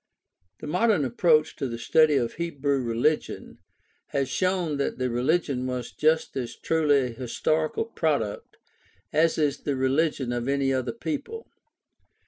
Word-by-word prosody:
— 90 0 -48
The - - -6
modern 180 0 +2
approach 155 +5 +2
to 135 - -2
the 115 -1 -5
study 155 +5 +4
of 120 -4 0
Hebrew 140 -5 -1
rehgion 120 +6 -1 0.5
has 140 -2 -1
shown 185 -5 0
that 140 - -2
that 130 -1 -1
rehgion 130 +1 0
was 125 -2 -4
just 155 +1 +1
as 120 -3 -4
truly 155 -3 +2
a 130 - -1
historical 155 - -1
product 150 - -2 0.6
as 160 +2 +3
is 145 -2 +1
the 145 - -2
religion 130 -1 0
of 120 0 -3
any 135 -1 +1
other 130 -1 -1
people. 310 - -5
140 Hz, 145 wpm, -26 LUFS, 125-160 Hz, 0.6 s, study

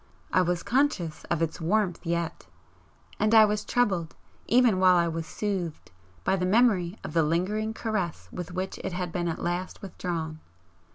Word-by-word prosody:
I 185 - +5
was 175 -1 0
conscious 245 - 0
of 170 -1 0
its 165 +1 -3
warmth 185 +1 +1
yet, 170 -1 -2 0.7
and 215 +1 +3
I 220 -1 +9
was 210 0 -1
troubled, 190 -9 0 0.3
even 240 -5 +4
while 185 -1 +6
I 170 -1 +3
was 165 -1 -3
soothed, 185 -3 -3 0.3
by 190 - +2
the 180 - -2
memory 200 -4 +3
of - - -6
the 165 - +4
lingering 185 +8 0
caress 185 - -2
with 180 0 -6
which 185 +1 -4
it - - -4
had 180 -1 -3
been 175 0 -1
at 165 - -3
last 175 +3 -3
withdrawn. 165 -4 -4
180 Hz, 170 wpm, -27 LUFS, 170-210 Hz, 0.7 s, I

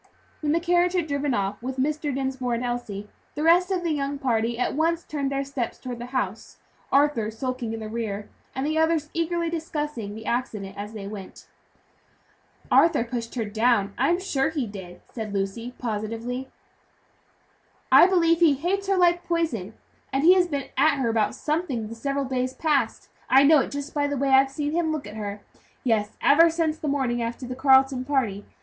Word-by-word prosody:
When 300 -1 0
the 330 - +3
carriage 350 +1 +2
had 355 -3 +1
driven 285 -3 -1
off 200 +1 -2
with 260 +2 -5
Mr. 295 +2 -1
Dinsmore 265 -2 -2
and 235 - -3
Elsie, 230 -5 -4 0.3
the 300 - -2
rest 350 +3 +5
of 370 -2 -1
the 335 - 0
young 285 -1 -2
party 235 -3 0
at 250 - 0
once 330 +3 +1
turned 280 -2 -3
their 275 0 -1
steps 270 -4 -4
toward 245 -2 -7
the 240 - -6
house; 230 -5 -3 0.3
Arthur 275 -6 +3
skulking 250 +1 -4
in 225 - -4
the 215 - -5
rear, 215 -2 -4 0.3
and 265 - -2
the 310 +1 0
others 320 -1 +1
eagerly 335 0 -1
discussing 300 -10 -4
the 220 0 -9
accident 210 -5 -3
as 205 +2 -7
they 210 -3 -7
went. 200 -2 -9 1.3
"Arthur 330 -8 +5
pushed 235 -1 -5
her 230 -3 -1
down, 215 -1 +1
I - - +2
am 350 +1 +2
sure 300 -7 0
he 300 -5 -2
did," 190 -4 -9
said 215 -3 -5
Lucy, 230 +6 -3
positively. 230 +3 -4 1.4
"I - - +9
believe 335 -3 +3
he 325 -5 +5
hates 380 +7 -1
her 390 -1 +2
like 350 -1 +3
poison, 285 - -2 0.4
and 270 +1 0
he 350 +3 +8
has 365 -1 +3
been 285 -5 -4
at 310 -2 +4
her 255 -4 0
about 225 -2 +1
something 300 -8 -2
the - - -6
several 275 +4 -2
days 255 0 -2
past 300 -4 0 0.2
I 270 +1 +7
know 300 +1 +7
it - - -1
just 285 +1 -6
by 290 -1 +1
the 285 0 -2
way 275 +1 0
I've 270 0 +6
seen 290 +2 -3
him 325 0 0
look 310 -6 -3
at 210 - -9
her 205 -1 -5 0.4
yes, 215 -4 0
ever 330 +4 +6
since 320 -1 -1
the 305 - -4
morning 260 -4 0
after 235 +2 -4
the 255 - -5
Carleton 265 -1 +4
party. 250 -8 -1
265 Hz, 195 wpm, -25 LUFS, 230-310 Hz, 1.4 s, I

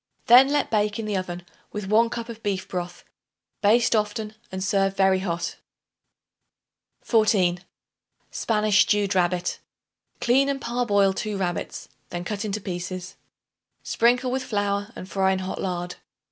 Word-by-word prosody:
Then 250 +3 +8
let 290 -1 0
bake 210 -1 +1
in 225 - -4
the 210 -1 -2
oven 180 -2 -4 0.3
with 210 -1 -5
1 220 +4 +3
cup 235 -1 -5
of 230 -1 -9
beef 195 -3 -2
broth. 180 -1 -5 0.6
Baste 225 +3 +4
often 215 0 -1 0.2
and 190 0 -4
serve 195 0 +1
very 190 -1 +4
hot. 170 -3 -3 1.5
14. 195 -6 +2 0.7
Spanish 210 -2 +2
Stewed 205 -1 +2
Rabbit. 180 -1 0 0.6
Clean 265 +3 +3
and 275 -1 -1
parboil 210 -6 +2
2 210 +1 -3
rabbits; 180 -3 -3 0.2
then 175 0 -4
cut 205 +2 -3
into 210 -1 -2
pieces. 185 -1 -5 0.7
Sprinkle 245 +2 +2
with 260 0 -1
flour 205 -1 -1
and 185 - -8
fry 190 0 +1
in - - -1
hot 185 0 -4
lard. 180 -1 -3
205 Hz, 145 wpm, -24 LUFS, 185-225 Hz, 1.5 s, Then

